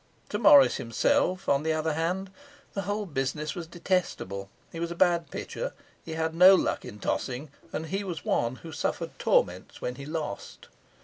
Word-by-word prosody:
To 210 - -2
Morris 140 - +7
himself, 180 +10 +1
on 140 0 +3
the 160 +1 0
other 155 0 0
hand, 180 +5 -1 0.4
the 195 - -2
whole 205 +1 -1
business 150 -1 -2
was 170 -2 -6
detestable; 165 - -2 0.2
he 165 - -7
was 170 0 -2
a 170 - -5
bad 170 -1 +2
pitcher, - - -5 0.3
he 160 - -6
had 160 0 -1
no 180 +3 +8
luck - - 0
in 120 -4 -9
tossing, 130 +7 -3 0.2
and 160 - -3
he 195 +5 -2
was 175 -5 -5
one 120 +2 +1
who 165 - -7
suffered - - -3
torments 90 +1 +1
when 125 0 -4
he 140 - -8
lost. 155 -9 -5
160 Hz, 180 wpm, -28 LUFS, 135-180 Hz, 0.4 s, no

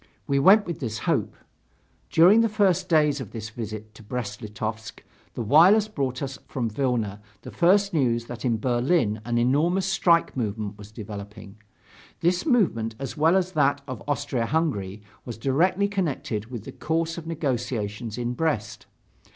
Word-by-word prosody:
We 140 -1 +1
went 200 +8 +6
with 170 -2 -5
this 110 -5 -3
hope. - - -1 0.7
During 190 +7 +6
the 230 - +2
first 200 -5 +1
days 150 -4 +3
of 115 - -7
this 115 -1 -6
visit 110 -2 -7
to 110 - -14
Brest 105 -1 -5
Litovsk 110 +1 -6 0.3
the 120 - -3
wireless 180 - +6
brought 135 -9 -3
us 135 -1 -5
from 120 -4 -3
Vilna 110 -5 -1 0.2
the - - -8
first 200 +3 +3
news 120 -6 +1
that 120 -1 -8
in 120 -3 +1
Berlin 120 -1 +1
an 120 0 -1
enormous 155 +10 +2
strike 175 -3 +2
movement 105 -4 -3
was 105 0 -13
developing; 105 -1 -9 0.6
this 175 - +1
movement 115 - +1
as 135 0 -6
well 160 +4 +4
as 185 -1 -1
that 145 -4 +2
of 130 -7 -6
Austria 140 -5 -1
Hungary 105 - -1 0.2
was 120 -3 -7
directly 175 - +1
connected 145 - -2
with 120 -4 -7
the - - -8
course 165 +1 -2
of 160 - -11
negotiations 120 -8 -3
in 120 0 -2
Brest. 115 -8 -2
130 Hz, 160 wpm, -25 LUFS, 110-165 Hz, 0.7 s, went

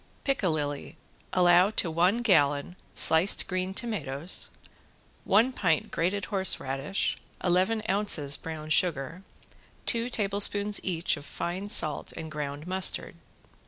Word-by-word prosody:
~PICALILLI~ 155 - -2 0.3
Allow 180 +1 +4
to 185 -6 0
one 180 +9 +1
gallon 145 -5 +2 0.2
sliced 165 +5 +4
green 185 0 -3
tomatoes 170 - -2 0.8
one 225 +6 +3
pint 165 -10 0
grated 185 +3 -1
horseradish, 165 -4 +1 0.3
eleven 185 +5 +1
ounces 180 -8 +1
brown 155 0 -7
sugar, 160 0 0 0.6
two 235 +1 +1
tablespoons 205 -1 +1
each 170 -3 -1
of 145 - -10
fine 185 +6 -5
salt 155 -8 +1
and 160 -1 -8
ground 145 0 -6
mustard. 185 +1 -1
180 Hz, 110 wpm, -27 LUFS, 155-200 Hz, 0.8 s, Allow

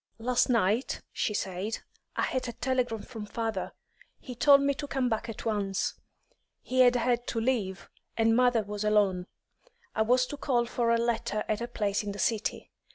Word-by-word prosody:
"Last 245 +3 +1
night," 230 +1 +1
she 210 - -1
said, 195 +3 -2 0.4
"I - - 0
had 260 -1 -1
a 240 - -4
telegram 250 -3 -1
from 220 -4 -8
father. 225 -3 -3 0.5
He 255 - -8
told 280 +3 +6
me 280 0 +2
to 285 +1 -6
come 265 -3 0
back 225 0 -2
at 225 - -7
once; 200 -3 0 0.7
he 255 +1 -1
had 250 -1 +7
had 245 0 +1
to 230 - -1
leave, 225 -6 -1 0.3
and 225 0 +4
mother 245 -2 +4
was 205 +1 -4
alone. 200 -4 +2 0.7
I - - 0
was 250 +3 +4
to 290 - -7
call 245 -4 +1
for 235 0 0
a 230 - +4
letter 230 -2 -1
at 215 +1 -1
a 235 - -2
place 205 -4 -1
in 205 -1 -4
the - - -8
city. 220 0 -1
230 Hz, 185 wpm, -29 LUFS, 210-250 Hz, 0.7 s, had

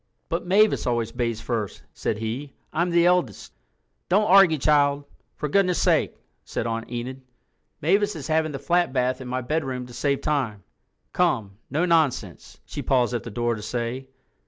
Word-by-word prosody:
"But 170 +2 -2
Mavis 205 -1 +3
always 120 -2 0
bathes 115 -2 -2
first," 110 -5 -3
said 105 - -2
he. 120 +6 -4 0.2
"I'm 170 +3 +1
the 170 0 +4
eldest." 175 - +1 0.6
"Don't 205 +4 +4
argue, 190 -5 +6
child, 145 0 +3 0.3
for 150 - -3
goodness' 180 +2 +2
sake," - - +2 0.3
said - - -4
Aunt 115 0 -3
Enid. 125 +2 -5 0.6
"Mavis 200 +5 +2
is 150 - -6
having 155 0 +1
the 140 - -4
flat 175 0 +1
bath 130 0 0
in 130 - -7
my 130 +1 -2
bedroom 130 -2 -2
to 125 - -13
save 140 +3 0
time. 120 -10 -1 0.5
Come—no 130 - 0
nonsense," 140 - 0
she - - -6
paused 125 -2 +2
at 120 - -1
the - - -8
door 120 +2 -1
to 110 - -6
say. 120 +4 -4
135 Hz, 165 wpm, -24 LUFS, 120-165 Hz, 0.6 s, argue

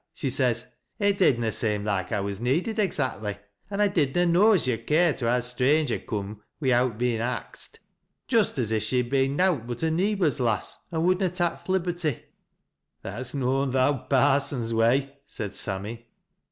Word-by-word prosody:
She 140 -8 -2
says, 125 -2 +1 0.2
' - - -49
It 200 -1 +1
did 140 -10 +4
nt 115 -2 -1
seem 105 -2 -1
loike 100 -2 -1
I 105 -3 0
was 100 0 -4
needed 170 - 0
exactly, 120 - -1 0.3
an' 205 0 -2
I 205 - +5
did 150 -9 0
na 175 0 +3
know 185 +6 +5
as 185 - +3
yo'd 115 -2 -2
care 165 +1 +4
to 120 -4 -2
ha' 125 - +3
a - - 0
stranger 130 +3 +2
coora 105 0 -5 0.2
wi'out 125 -5 +2
bein' 120 -1 0
axt.' 125 +2 -5 0.5
Just 225 - +2
as 115 -4 0
if 110 -1 +1
she 130 - 0
had 125 0 -1
been 135 0 +2
nowt 170 -9 +1
but 120 +4 -5
a 160 - +2
neebor's 180 - +1
lass, 115 -5 -1
and 165 0 0
would 185 +1 +3
na 190 - +2
tak 175 -1 -2
th' - - -14
liberty." 175 -6 -1 0.4
" - - -55
That's 120 +8 -6
noan 135 0 0
th' - - -1
owd 135 +1 +1
parson's 135 -3 +2
way," 135 +5 +2
said 105 -2 -6
Sammy. 105 +4 -4
130 Hz, 195 wpm, -26 LUFS, 115-165 Hz, 0.5 s, I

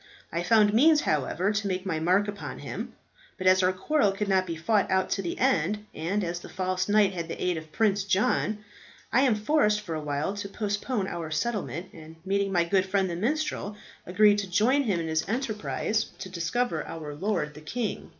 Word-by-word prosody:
I 170 - -1
found 210 +3 +4
means, 300 +6 +5
however, 160 +6 0
to 205 -1 -1
make 185 0 -2
my 165 -4 -1
mark 185 +5 +2
upon 205 0 -6
him; - - -6 0.4
but 185 - -6
as 185 0 +6
our 185 0 +3
quarrel 205 +4 +1
could 200 +1 -3
not 190 -1 +2
be 165 - -3
fought 200 +5 +1
out 190 0 +1
to 195 - 0
the 175 -3 -4
end, 210 - +1
and 185 +6 -1
as 175 0 -3
the - - -11
false 185 0 -2
knight 205 -2 +4
had 170 -2 -4
the - - -6
aid 180 -1 0
of 160 -1 -8
Prince 205 -1 +2
John, 205 +2 +1 0.5
I 255 - +5
am 260 -5 +4
forced 210 -2 +2
for 180 -6 -6
a 155 - -3
while 150 +5 -2
to 200 -1 -5
postpone 205 +1 -2
our 170 -3 -5
settlement, 185 -1 -2
and 160 0 -12
meeting 195 0 0
my 175 -2 +3
good 190 +2 +1
friend 190 -1 +1
the - - -3
minstrel, 220 - -2 0.3
agreed 205 +3 +5
to 195 -2 -4
join 255 +10 +3
him 195 -6 +1
in 165 - -3
his 160 +2 -1
enterprise 220 -2 -1
to 185 - -7
discover 185 +8 -1
our 155 -2 -6
lord 150 -2 -2
the 150 - -12
king." 225 +8 -4
195 Hz, 210 wpm, -27 LUFS, 170-210 Hz, 0.5 s, as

